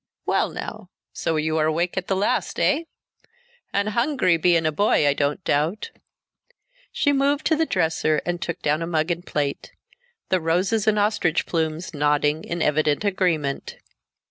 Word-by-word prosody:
"Well - - +1
now. - - -7 0.2
So 165 - -1
you 155 +1 0
are 155 - +2
awake 170 +3 0
at 190 -1 -3
the 195 - +1
last, 195 +2 -1
eh? 310 +3 +2 0.9
And 200 +1 0
hungry, 235 - +2
bein' 165 0 +2
a 155 - +2
boy, 155 -3 +2
I 145 - +4
don't 145 +5 -1
doubt?" 165 - -1 1.0
She 285 - +1
moved 280 +1 +1
to 320 - +3
the 320 +1 0
dresser 160 -1 +1
and 175 0 -2
took 170 0 -4
down 150 +2 +1
a 165 - -2
mug 160 0 0
and 170 +1 -3
plate, 145 -5 -3 0.6
the 185 -1 +1
roses 185 +7 +1
and 215 -1 +3
ostrich 205 -5 +1
plumes 160 +1 -2
nodding 150 +1 +1
in 170 -1 -3
evident 150 +4 +1
agreement. 170 -8 -1
170 Hz, 165 wpm, -23 LUFS, 155-200 Hz, 1.0 s, I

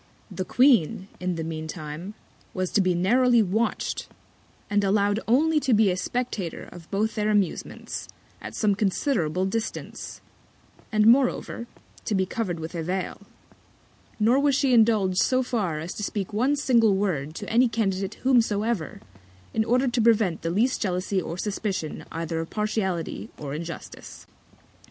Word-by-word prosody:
The 185 - -4
Queen, 205 - +3
in 180 -1 -2
the 165 - -3
mean 160 -1 -5
Time, 160 +5 -7 0.4
was 185 -1 -1
to 205 - +3
be 185 -2 +2
narrowly 235 +6 +4
watch'd, 215 +5 -1 0.6
and 205 0 +1
allow'd 205 +1 +2
only 305 +7 +3
to 265 -5 +2
be 210 -2 +4
a - - 0
Spectator 210 -3 -3
of 170 -2 -12
both 215 +3 0
their 210 -1 0
Amusements, 205 -4 -2 0.3
at - - -7
some 210 -2 +2
considerable 190 - 0
Distance; 220 +4 -4 0.7
and 215 -1 +3
moreover, 240 -1 +3 0.4
to 210 - 0
be 190 -1 +2
cover'd 185 -4 -3
with 160 +1 -6
a 170 - -3
Vail: 185 +4 -3 1.0
Nor 235 +5 +4
was 280 -1 +3
she 270 -2 +2
indulg'd 215 -5 +4
so 255 0 +3
far 200 -11 -1
as 165 +3 -5
to - - -7
speak 200 0 -3
one 255 +7 +2
single 235 -7 +3
Word 165 -7 -1
to 205 - -6
any 245 +3 +4
Candidate 195 -4 -1
whomsoever, 225 - +1 0.5
in 220 - +2
order 250 +4 +2
to 240 -1 +1
prevent 215 -7 +3
the 165 - -2
least 225 +9 +1
Jealousy 185 0 0
or 170 0 -5
Suspicion 195 -5 -3
either 165 0 -3
of 165 - -4
Partiality 205 -6 -2
or 140 -2 -6
Injustice. 165 +2 -8
205 Hz, 155 wpm, -25 LUFS, 180-230 Hz, 1.0 s, narrowly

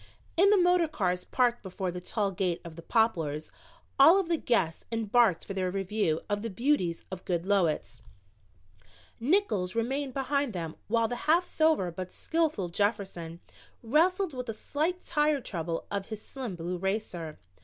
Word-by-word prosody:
In 380 +4 +5
the 415 - +6
motor 355 -2 +4
cars 180 -10 -1
parked 240 -2 +1
before 190 -1 -4
the 180 0 -6
tall 200 +2 -1
gate 180 -2 -1
of 165 -2 -8
the 170 - -9
Poplars 165 -9 0 0.5
all 330 +8 +8
of 365 -4 -2
the 335 - +2
guests 185 - 0
embarked 225 -4 +2
for 195 - -5
their 185 -1 -1
review 195 -3 0
of 205 0 -1
the 230 - -3
beauties 195 - 0
of 185 -1 -6
Goodloets. 175 - 0 1.2
Nickols 230 - +1
remained 265 +3 -1
behind 280 -2 0
them 165 -3 -4
while 230 +1 +2
the 245 - -3
half 340 +3 +5
sober 315 - +2
but 185 +2 -6
skillful 310 - 0
Jefferson 175 -3 -2 0.4
wrestled 335 - +2
with 250 -2 -5
a - - -1
slight 320 +10 -2
tire 300 -2 +2
trouble 170 -8 -4
of 200 -1 -2
his 215 -2 -6
slim 240 -3 -6
blue 175 +1 -4
racer. 185 -5 -3
210 Hz, 160 wpm, -29 LUFS, 180-280 Hz, 1.2 s, all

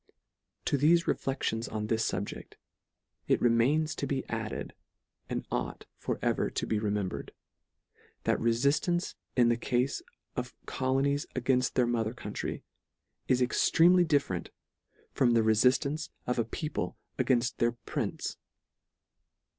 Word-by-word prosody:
To 145 - +1
thefe 170 +4 +5
reflections 120 -4 -1
on 110 -1 -3
this 110 +1 +1
fubject, - - -5 0.7
it - - +3
re 120 - +4
mains 150 +7 +3
to 140 - -2
be 135 -1 -2
added, 110 -1 -4 0.6
and - - -3
ought - - -3
for - - -2
ever - - +1
to - - -2
be 110 - 0
remembred; 105 -3 -2 0.9
that - - +2
refiftance 140 +9 +1 0.2
in 120 -2 +5
the 120 - +2
cafe 125 +2 +1 0.5
of 125 0 -4
colonies 135 +2 0
againft 130 0 +2
their 125 - +3
mother 115 -1 0
country, - - -5 0.6
is 130 -1 +3
ex 125 - +2
tremely 175 +1 +6
different 140 - 0 0.6
from 125 -4 +3
the 115 - +5
refiftance 130 +7 +2 0.2
of 125 0 0
a 115 - +2
people 115 - -3 0.2
againft 120 -3 +2
their 120 0 +2
prince. 120 - -4
125 Hz, 130 wpm, -30 LUFS, 115-140 Hz, 0.9 s, tremely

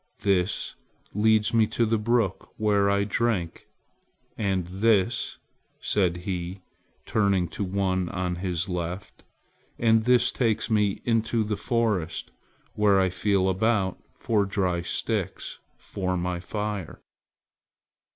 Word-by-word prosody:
"This 95 -1 +1 0.4
leads 110 +1 +3
me 110 -2 +4
to 115 - +1
the 110 0 +1
brook 110 -3 0
where 100 -2 +2
I 100 0 +2
drink! 100 -5 -1 0.7
and 95 -4 0
this," 105 +4 +1 0.4
said 90 -4 +1
he, 90 0 -4 0.4
turning 100 -4 +2
to 95 - -4
the 95 - -4
one 95 -2 0
on 90 -1 -2
his 90 0 -2
left, 90 +2 -5 0.5
"and 110 -1 +3
this 125 0 +4
takes 115 -2 0
me 105 -2 +1
into 115 -1 +1
the 105 0 -2
forest, 105 -6 -1 0.4
where 105 -2 +4
I 95 -1 +2
feel 100 0 +1
about 95 0 +1 0.2
for 105 -3 +1
dry 95 -3 0
sticks 85 - -3 0.2
for 90 -1 -3
my 90 0 -2
fire." 105 -1 -4
100 Hz, 120 wpm, -26 LUFS, 90-110 Hz, 0.7 s, me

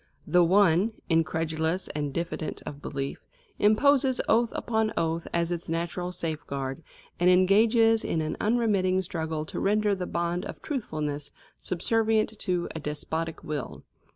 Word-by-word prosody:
The 180 0 +4
one, 190 +3 +4 0.2
incredulous 160 +1 0
and 145 -1 -3
diffident 170 0 -4
of 145 0 -7
belief, 135 -1 -4 0.4
imposes 260 +5 +4
oath 230 +1 +3
upon 220 -2 0
oath 165 0 -1
as 170 0 0
its 170 -1 -4
natural 170 +2 -2
safeguard, 145 -5 -4 0.4
and 175 +1 +4
engages 220 +5 +5
in 165 - -1
an 155 0 -2
unremitting 205 -5 +2
struggle 160 -3 -3
to - - -5
render 210 +1 +2
the 185 -2 -3
bond 170 +1 -1
of - - -7
truthfulness 150 - -3 0.3
subservient 220 +3 0
to 180 -3 -1
a 160 - -4
despotic 160 +2 -4
will. 150 -3 -5
175 Hz, 135 wpm, -27 LUFS, 160-210 Hz, 0.4 s, engages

